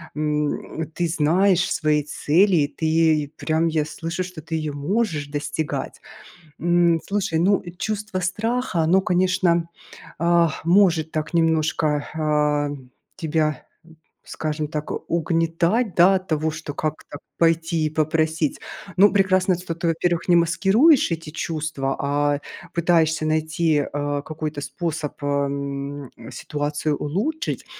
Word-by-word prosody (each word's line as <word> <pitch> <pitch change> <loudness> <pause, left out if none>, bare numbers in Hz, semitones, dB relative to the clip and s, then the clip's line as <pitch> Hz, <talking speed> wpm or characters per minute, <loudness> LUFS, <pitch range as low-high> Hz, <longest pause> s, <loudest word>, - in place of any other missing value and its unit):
м, 150 +1 -2
ты 175 -1 0
знаешь 180 +4 +2
свои 150 -1 +2
цели, 160 +1 +2
ты 160 -2 +2
прям 160 +1 0
я 155 -2 0
слышу, 165 +3 -4
что 180 -3 -9
ты 160 +2 -5
её 155 -2 -2
можешь 155 0 -1
достигать, 145 +1 -4 0.6
м. 170 0 +3
Слушай, 195 -5 -1
ну, 195 +4 +3 0.2
чувство 210 -2 -3
страха- 210 +2 -1
оно, 180 +4 +3
конечно, 180 -2 +1 0.5
ах, 170 -2 +2
может 170 -3 +3
так 155 +1 -3
немножко, 155 -2 +1
а, 150 -1 +1 0.7
тебя, 155 -4 -1 0.6
скажем 155 -1 -3
так, 150 -1 -5 0.2
угнетать, 170 +6 +1
да, 180 +3 +6
от 185 0 -3
того, 155 0 0
что 155 -2 -7
как-то 155 -1 -4 0.2
пойти 165 -1 +2
и - - -3
попросить. 155 0 0 0.4
Ну, 200 +2 +7
прекрасно, 190 -2 +3
что 180 -2 -5
ты, 170 +1 -3
во-первых, 170 +1 0
не 175 - +6
маскируешь 195 - +4
эти 165 -2 -4
чувства, 155 -4 -3
а 145 0 +1 0.4
пытаешься 160 -2 +2
найти, 155 -1 +1
а, 145 0 -2
какой-то 155 -1 -5
способ, 155 +1 -4
ам, 140 -1 -3 0.2
ситуацию 150 0 -2
улучшить. 220 - -2
160 Hz, 120 wpm, -22 LUFS, 150-175 Hz, 0.7 s, Ну